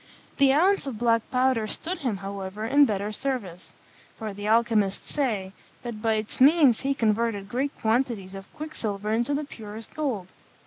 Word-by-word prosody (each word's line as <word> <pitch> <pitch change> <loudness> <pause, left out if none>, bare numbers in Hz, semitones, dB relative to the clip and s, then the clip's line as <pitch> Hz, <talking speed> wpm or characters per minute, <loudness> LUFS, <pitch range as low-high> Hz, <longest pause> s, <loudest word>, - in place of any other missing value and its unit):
The 275 -1 +5
ounce 355 +3 +3
of 250 -5 -4
black 230 -1 +1
powder 255 -4 +2
stood 330 - -2
him, 245 - -1
however, 195 +1 -5
in 285 +5 +5
better 205 -3 -2
service; 215 -8 -4 0.4
for 215 -2 -5
the 205 +1 -5
alchymists 220 -3 +1
say, 215 -10 -1 0.3
that 235 -3 -6
by 225 -1 +2
its 215 +3 -4
means 280 -4 +6
he 275 0 0
converted 220 -3 0
great 265 +6 -2
quantities 220 -4 0
of 195 0 -10
quicksilver 215 -10 -4
into 240 +6 +1
the 295 +1 -2
purest 220 -3 -9
gold. 245 -12 -2
225 Hz, 165 wpm, -26 LUFS, 205-270 Hz, 0.4 s, means